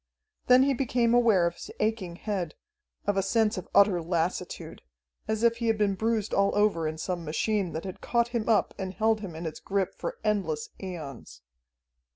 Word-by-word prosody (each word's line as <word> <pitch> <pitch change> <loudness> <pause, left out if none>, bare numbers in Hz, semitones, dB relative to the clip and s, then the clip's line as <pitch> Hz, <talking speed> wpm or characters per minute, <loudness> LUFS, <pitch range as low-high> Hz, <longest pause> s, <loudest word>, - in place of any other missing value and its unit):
Then 255 +1 +7
he 275 0 +3
became 240 -2 +1
aware 225 -7 +5
of 170 - 0
his - - -10
aching 210 -5 -1
head, 185 -4 -3 0.5
of 205 -1 +1
a - - +4
sense 215 +2 +2
of 185 - -6
utter 200 -3 +5
lassitude, 175 +1 -3 0.5
as 220 +1 -1
if 230 0 +4
he 235 -1 -2
had 225 -1 +2
been 205 -2 +2
bruised 220 +1 -1
all 200 0 +2
over 205 -6 +2
in 155 0 -4
some 175 +1 -3
machine 185 +4 0
that 160 +3 -4
had 185 - -7
caught 235 -1 +1
him 235 -2 -2
up 215 -3 +3
and 190 -1 -4
held 220 0 +2
him 190 -6 -7
in 165 +2 -6
its 155 -1 -5
grip 195 -1 -1
for - - -5
endless 190 -8 -1
aeons. 140 - -8
200 Hz, 190 wpm, -28 LUFS, 175-225 Hz, 0.5 s, Then